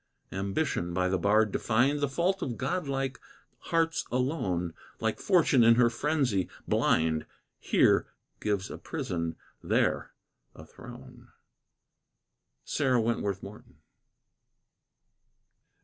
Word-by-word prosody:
Ambition, 95 Hz, -, -2 dB
by 90 Hz, 0 st, +1 dB
the 95 Hz, 0 st, 0 dB
bard 105 Hz, +3 st, +3 dB
defined 125 Hz, +9 st, +1 dB
The 145 Hz, -2 st, 0 dB
fault 180 Hz, +7 st, 0 dB
of 120 Hz, -4 st, -3 dB
godlike 135 Hz, -3 st, -2 dB, 0.5 s
hearts 165 Hz, 0 st, +1 dB
alone, 110 Hz, -, -1 dB, 0.3 s
Like 110 Hz, -1 st, -1 dB
fortune 165 Hz, -10 st, +4 dB
in 115 Hz, 0 st, +7 dB
her 120 Hz, -1 st, +4 dB
frenzy, 130 Hz, -, 0 dB, 0.2 s
blind, 80 Hz, -1 st, +1 dB, 0.3 s
Here -, -, +3 dB, 0.3 s
gives 100 Hz, -3 st, -2 dB
a -, -, -7 dB
prison, 85 Hz, -2 st, -3 dB, 0.3 s
there -, -, +1 dB, 0.5 s
a -, -, -11 dB
throne. -, -, -13 dB, 1.4 s
SARAH 130 Hz, -4 st, +1 dB
WENTWORTH 105 Hz, -4 st, -1 dB
MORTON. 100 Hz, +2 st, -11 dB
115 Hz, 100 wpm, -29 LUFS, 95-140 Hz, 1.4 s, in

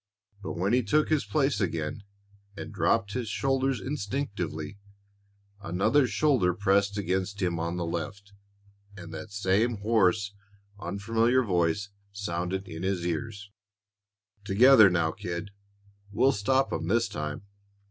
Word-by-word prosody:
But 100 Hz, -, -5 dB
when 95 Hz, +5 st, 0 dB
he 125 Hz, -, +4 dB
took 140 Hz, +8 st, +1 dB
his 155 Hz, -2 st, +1 dB
place 140 Hz, -5 st, +1 dB
again 85 Hz, 0 st, -2 dB, 0.6 s
and -, -, -7 dB
dropped 105 Hz, -3 st, +1 dB
his 125 Hz, -4 st, -3 dB
shoulders 135 Hz, 0 st, 0 dB
instinctively, 100 Hz, -, -4 dB, 0.8 s
another 100 Hz, -, +2 dB
shoulder 120 Hz, -, +2 dB
pressed 100 Hz, +1 st, +2 dB
against 95 Hz, +1 st, -2 dB
him 90 Hz, -3 st, -1 dB
on 85 Hz, +1 st, -2 dB
the 85 Hz, -, -2 dB
left, 100 Hz, +4 st, -5 dB, 0.6 s
and 85 Hz, -3 st, -9 dB
that 105 Hz, +6 st, -8 dB
same 105 Hz, +4 st, +1 dB
hoarse, 105 Hz, -1 st, +2 dB, 0.5 s
unfamiliar 115 Hz, +7 st, +1 dB
voice 90 Hz, 0 st, 0 dB, 0.2 s
sounded 95 Hz, -1 st, -3 dB
in 80 Hz, -, -7 dB
his 95 Hz, -2 st, -1 dB
ears: 100 Hz, +4 st, -4 dB, 0.9 s
"Together 110 Hz, +2 st, +7 dB
now, 85 Hz, -3 st, +1 dB
kid; 85 Hz, +4 st, -6 dB, 0.6 s
we'll 130 Hz, +6 st, +3 dB
stop 130 Hz, +4 st, +1 dB
'em 80 Hz, -, -3 dB
this 115 Hz, +4 st, +2 dB
time!" 75 Hz, -4 st, -5 dB
100 Hz, 125 wpm, -28 LUFS, 90-115 Hz, 0.9 s, Together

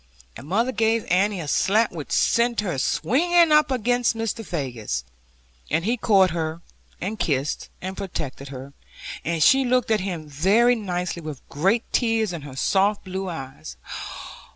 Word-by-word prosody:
And 140 Hz, -, -10 dB
mother 230 Hz, +9 st, +1 dB
gave 225 Hz, -2 st, +1 dB
Annie 195 Hz, +2 st, +2 dB
a 160 Hz, -, -5 dB
slap 215 Hz, +9 st, +2 dB
which 160 Hz, -4 st, -7 dB
sent 235 Hz, -1 st, +2 dB
her 175 Hz, -10 st, -2 dB
swinging 335 Hz, -, +3 dB
up 300 Hz, -1 st, +5 dB
against 245 Hz, -1 st, +1 dB
Mr. 225 Hz, 0 st, -2 dB
Faggus, 120 Hz, -, -3 dB, 0.7 s
and 165 Hz, +4 st, 0 dB
he 235 Hz, +3 st, +2 dB
caught 195 Hz, -6 st, +4 dB
her, 165 Hz, 0 st, -3 dB, 0.4 s
and 210 Hz, +4 st, -4 dB
kissed 140 Hz, -1 st, -1 dB
and 190 Hz, +1 st, -4 dB
protected 150 Hz, -8 st, -5 dB
her, 135 Hz, +1 st, -9 dB, 0.5 s
and 165 Hz, -1 st, +1 dB
she 270 Hz, -, +6 dB
looked 250 Hz, -2 st, +1 dB
at 215 Hz, -, +3 dB
him 175 Hz, -5 st, -4 dB
very 195 Hz, -, +3 dB
nicely, 180 Hz, -6 st, -3 dB
with 155 Hz, -4 st, -8 dB
great 195 Hz, -, +1 dB
tears 225 Hz, -5 st, +1 dB
in 170 Hz, -, -5 dB
her 140 Hz, -2 st, -9 dB
soft 200 Hz, +8 st, +1 dB
blue 190 Hz, 0 st, -4 dB
eyes. 135 Hz, -, -8 dB
190 Hz, 155 wpm, -24 LUFS, 155-225 Hz, 0.7 s, she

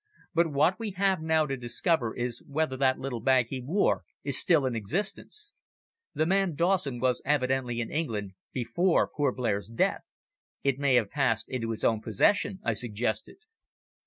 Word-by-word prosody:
"But 170 Hz, 0 st, +3 dB
what 155 Hz, +9 st, +2 dB
we 220 Hz, -4 st, -4 dB
have 190 Hz, -3 st, +2 dB
now 160 Hz, -1 st, +2 dB
to 135 Hz, -2 st, -2 dB
discover 120 Hz, +1 st, -1 dB
is 120 Hz, -1 st, -3 dB
whether 145 Hz, -1 st, -1 dB
that 130 Hz, 0 st, +2 dB
little 130 Hz, -3 st, -4 dB
bag 125 Hz, 0 st, +3 dB
he 130 Hz, -2 st, -4 dB
wore 165 Hz, +11 st, +1 dB, 0.2 s
is 140 Hz, -2 st, 0 dB
still 160 Hz, -6 st, +4 dB
in 125 Hz, -2 st, -1 dB
existence." 200 Hz, -, -4 dB, 0.6 s
"The 155 Hz, -, +2 dB
man 190 Hz, -1 st, +1 dB
Dawson 170 Hz, -6 st, +1 dB
was 125 Hz, 0 st, +1 dB
evidently 130 Hz, -4 st, 0 dB
in 115 Hz, -, -5 dB
England 110 Hz, -11 st, -2 dB, 0.2 s
before 135 Hz, +9 st, +1 dB
poor 145 Hz, -3 st, 0 dB
Blair's 105 Hz, -6 st, -2 dB
death. 115 Hz, -, 0 dB, 0.6 s
It 140 Hz, -1 st, +1 dB
may 140 Hz, -2 st, +3 dB
have 110 Hz, -5 st, +2 dB
passed 125 Hz, -6 st, 0 dB
into 120 Hz, -3 st, -3 dB
his 115 Hz, -, -2 dB, 0.2 s
possession," 185 Hz, -, +1 dB
I 115 Hz, -, +1 dB
suggested. 110 Hz, -, -3 dB
135 Hz, 160 wpm, -28 LUFS, 120-165 Hz, 0.6 s, still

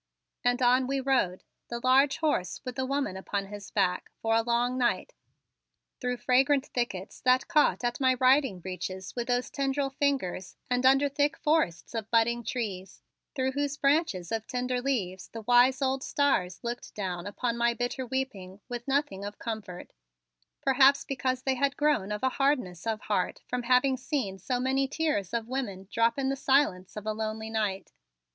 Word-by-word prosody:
And 245 Hz, +1 st, +2 dB
on 250 Hz, +1 st, +4 dB
we 275 Hz, +1 st, 0 dB
rode, 260 Hz, -9 st, +1 dB, 0.2 s
the 235 Hz, -, -4 dB
large 270 Hz, +3 st, +4 dB
horse 295 Hz, -, 0 dB
with 250 Hz, -1 st, -5 dB
the 260 Hz, 0 st, -2 dB
woman 275 Hz, -7 st, -1 dB
upon 195 Hz, +1 st, -3 dB
his 205 Hz, -1 st, -8 dB
back, 190 Hz, -3 st, 0 dB
for 225 Hz, 0 st, 0 dB
a 225 Hz, -, +4 dB
long 240 Hz, +2 st, +1 dB
night, 250 Hz, -2 st, 0 dB, 0.9 s
through 250 Hz, -1 st, -2 dB
fragrant 270 Hz, +3 st, +3 dB
thickets 220 Hz, -8 st, -4 dB
that 255 Hz, 0 st, +3 dB
caught 300 Hz, -4 st, +3 dB
at 240 Hz, +2 st, -1 dB
my 260 Hz, -1 st, +3 dB
riding 255 Hz, -6 st, +3 dB
breeches 185 Hz, +1 st, -6 dB
with 240 Hz, 0 st, -3 dB
rose 245 Hz, 0 st, 0 dB
tendril 275 Hz, 0 st, -1 dB
fingers 265 Hz, -11 st, -1 dB, 0.2 s
and 250 Hz, +1 st, +3 dB
under 270 Hz, +2 st, +5 dB
thick 290 Hz, +3 st, 0 dB
forests 300 Hz, -, 0 dB
of 220 Hz, -2 st, -4 dB
budding 235 Hz, +1 st, +2 dB
trees, 210 Hz, -6 st, -5 dB, 0.3 s
through 260 Hz, -1 st, 0 dB
whose 285 Hz, +1 st, -2 dB
branches 275 Hz, -, +1 dB
of 225 Hz, -1 st, -2 dB
tender 250 Hz, -1 st, -1 dB
leaves 200 Hz, -9 st, -2 dB
the 225 Hz, -1 st, -9 dB
wise 245 Hz, +4 st, +4 dB
old 265 Hz, 0 st, 0 dB
stars 185 Hz, -11 st, 0 dB
looked 240 Hz, +1 st, -5 dB
down 185 Hz, -3 st, -3 dB
upon 235 Hz, +3 st, -2 dB
my 235 Hz, 0 st, +1 dB
bitter 245 Hz, +2 st, -2 dB
weeping 235 Hz, -8 st, -4 dB
with 240 Hz, 0 st, -6 dB
nothing 275 Hz, -8 st, 0 dB
of 205 Hz, +1 st, -6 dB
comfort, 215 Hz, -6 st, -6 dB, 0.7 s
perhaps 275 Hz, +1 st, +5 dB
because 255 Hz, -1 st, -2 dB
they 265 Hz, -, +1 dB
had 280 Hz, +2 st, 0 dB
grown 290 Hz, -10 st, +1 dB
of 210 Hz, +3 st, -4 dB
a 260 Hz, -, +4 dB
hardness 240 Hz, -, 0 dB
of 220 Hz, -1 st, -1 dB
heart 195 Hz, -4 st, -1 dB
from 250 Hz, 0 st, -2 dB
having 250 Hz, +2 st, +3 dB
seen 250 Hz, -8 st, -3 dB
so 245 Hz, +6 st, -2 dB
many 265 Hz, +2 st, +1 dB
tears 290 Hz, -, -1 dB
of 230 Hz, -1 st, -2 dB
women 215 Hz, -8 st, -4 dB
drop 230 Hz, +2 st, +2 dB
in 270 Hz, -1 st, 0 dB
the 275 Hz, -, 0 dB
silence 265 Hz, -10 st, +1 dB
of 210 Hz, -, -6 dB
a 215 Hz, -, -1 dB
lonely 220 Hz, 0 st, -4 dB
night. 210 Hz, -3 st, -2 dB
245 Hz, 175 wpm, -28 LUFS, 210-270 Hz, 0.9 s, under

